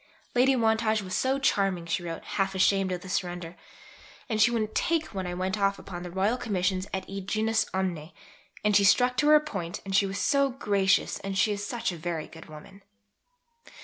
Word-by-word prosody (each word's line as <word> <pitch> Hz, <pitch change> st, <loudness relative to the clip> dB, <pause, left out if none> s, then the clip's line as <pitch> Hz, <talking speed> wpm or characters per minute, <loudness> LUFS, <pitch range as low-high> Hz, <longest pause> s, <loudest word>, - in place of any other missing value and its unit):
"Lady 260 Hz, +2 st, +4 dB
Wantage 220 Hz, -2 st, +1 dB
was 185 Hz, -1 st, -7 dB
so 265 Hz, +1 st, +1 dB
charming," 195 Hz, -9 st, +1 dB
she 170 Hz, +2 st, -1 dB
wrote, 165 Hz, -1 st, -6 dB
half 195 Hz, -1 st, -1 dB
ashamed 190 Hz, 0 st, +2 dB
of 180 Hz, -1 st, -3 dB
the 190 Hz, -, -10 dB
surrender, 175 Hz, -2 st, -3 dB, 0.7 s
"and 220 Hz, -3 st, 0 dB
she 220 Hz, -, +6 dB
wouldn't 220 Hz, -2 st, -2 dB
'take' 330 Hz, -5 st, 0 dB
when 190 Hz, -2 st, -3 dB
I 175 Hz, -, -4 dB
went 185 Hz, +3 st, -2 dB
off 200 Hz, 0 st, +2 dB
upon 175 Hz, -2 st, -8 dB
Royal 195 Hz, +6 st, +1 dB
Commissions 190 Hz, -5 st, -1 dB
et 190 Hz, -1 st, -3 dB
id 195 Hz, -1 st, -7 dB
genus 220 Hz, +1 st, +1 dB
omne, 180 Hz, -4 st, -3 dB, 0.5 s
and 210 Hz, -1 st, +3 dB
she 200 Hz, -, +6 dB
stuck 250 Hz, +5 st, +4 dB
to 295 Hz, -, +2 dB
her 305 Hz, 0 st, +7 dB
point 195 Hz, -, -5 dB
and 195 Hz, 0 st, -2 dB
she 200 Hz, 0 st, +4 dB
was 195 Hz, +1 st, -4 dB
so 280 Hz, +3 st, +2 dB
gracious 200 Hz, -6 st, +1 dB
and 195 Hz, 0 st, -4 dB
she 210 Hz, -, +3 dB
is 205 Hz, 0 st, -3 dB
such 235 Hz, -2 st, -2 dB
a 175 Hz, -, -7 dB
very 160 Hz, -1 st, -3 dB
good 160 Hz, -, -13 dB
woman." 155 Hz, +6 st, -13 dB
195 Hz, 200 wpm, -27 LUFS, 185-220 Hz, 0.7 s, her